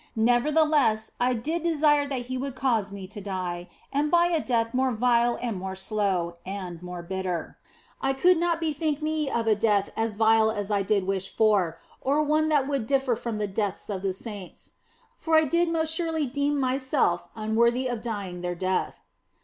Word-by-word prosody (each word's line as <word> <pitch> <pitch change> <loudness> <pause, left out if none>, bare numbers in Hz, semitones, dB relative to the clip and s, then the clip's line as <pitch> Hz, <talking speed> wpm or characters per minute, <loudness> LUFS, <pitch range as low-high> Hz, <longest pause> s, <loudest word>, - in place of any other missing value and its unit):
Nevertheless, 245 0 +3
I 250 +1 +2
did 315 +9 -2
desire 300 -3 +3
that 265 -3 -3
He 255 +1 -5
would 265 0 -4
cause 230 -7 0
me 200 -1 -7
to 205 +2 -8
die, 180 -3 -4 0.2
and 290 +2 +1
by 345 +2 +4
a 330 -3 +1
death 230 -3 0
more 260 0 +2
vile 240 +1 +2
and 230 -6 -3
more 190 0 -5
slow, 190 -3 -1
and 185 -3 -6
more 180 -1 -7
bitter. 185 -2 -4 0.4
I 270 0 +1
could 350 +7 +4
not 340 -1 +1
bethink 310 -2 -1
me 310 -2 0
of 235 -3 -1
a 220 - +4
death 205 -2 +1
as 225 -1 -1
vile 220 0 +4
as 205 -2 -3
I 200 -1 +2
did 195 -1 +1
wish 195 0 -2
for, 195 -7 +2 0.2
or 285 +3 +2
one 310 +1 +2
that 290 -3 +2
would 275 -6 -2
differ 270 -2 +2
from 230 -1 -4
the 210 - -1
deaths 200 +1 -3
of 190 -2 -3
the 195 -1 0
saints 200 -1 -9 0.4
for 320 -1 0
I 315 - +6
did 340 +3 +1
most 320 -1 0
surely 325 -3 0
deem 285 +2 0
myself 260 - +1
unworthy 235 +3 +1
of 240 -3 -3
dying 200 -6 -4
their 175 0 -3
death. 185 +1 -2
235 Hz, 190 wpm, -26 LUFS, 200-285 Hz, 0.4 s, I